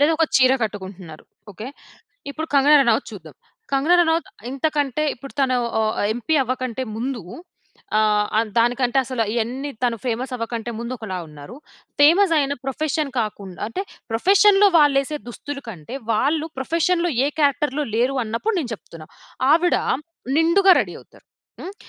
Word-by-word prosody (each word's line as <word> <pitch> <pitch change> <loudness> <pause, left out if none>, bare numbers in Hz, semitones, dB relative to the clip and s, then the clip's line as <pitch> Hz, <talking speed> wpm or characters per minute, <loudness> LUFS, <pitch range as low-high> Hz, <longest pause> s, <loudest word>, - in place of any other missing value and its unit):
లేదా 295 +3 +4
ఒక 325 - +3
చీర 255 0 +5
కట్టుకుంటున్నారు. 190 -6 -6 0.3
ఓకె. 215 +5 -8 0.6
ఇప్పుడు 315 +3 -5
కంగనా 285 +2 +6
రనౌత్ 235 -4 +1
చూద్దాం. 160 -8 -11 0.4
కంగనా 280 +6 +3
రనౌత్ 325 0 0 0.2
ఇంతకంటే, 290 0 -1
ఇప్పుడు 275 +3 -11
తను 255 -2 +2 0.2
ఆహ్, 220 - +1
ఆహ్, 205 - +1
ఎంపీ 245 +7 -1
అవ్వకంటే 255 0 -3
ముందు, 245 -1 -3 0.8
ఆహ్, 210 -1 +2
ఆహ్, 225 -1 0
దానికంటే 245 +2 +2
అసల 255 -2 -2
ఇయన్ని 250 +5 -2
తను 235 -1 +1
ఫేమస్ 250 +2 -2
అవ్వకంటే 230 0 -4
ముందు 235 +2 -4
ఒకలా 190 -5 -5
ఉన్నారు. 150 - -11 0.4
ఫేమస్ 335 +5 +5
అయిన 280 -1 0
ప్రొఫెషన్ 295 +2 -2
కాకుండా 200 -4 -6
అంటే, 370 - -4 0.3
ప్రొఫెషన్‌లో 400 - +5
వాళ్ళేసే 290 0 +2
దుస్తులు 275 +4 -7
కంటే, 190 - -8 0.2
వాళ్ళు 300 +8 0
ప్రొఫెషన్‌లో 335 +5 0 0.2
ఏ - - +1
క్యారెక్టర్‌లో 290 0 +1
లేరు 250 +4 +1
అన్నప్పుడు 230 - -2
నేను 255 -6 -5
చెప్తున్నా. 165 -6 -13 0.4
ఆవిడ 345 +2 +3 0.6
నిండుగా 365 +4 +5
రెడీ - - -4
అవుతారు. - - -22 0.3
హ్మ్. 385 - -7
260 Hz, 145 wpm, -21 LUFS, 225-305 Hz, 0.8 s, కంగనా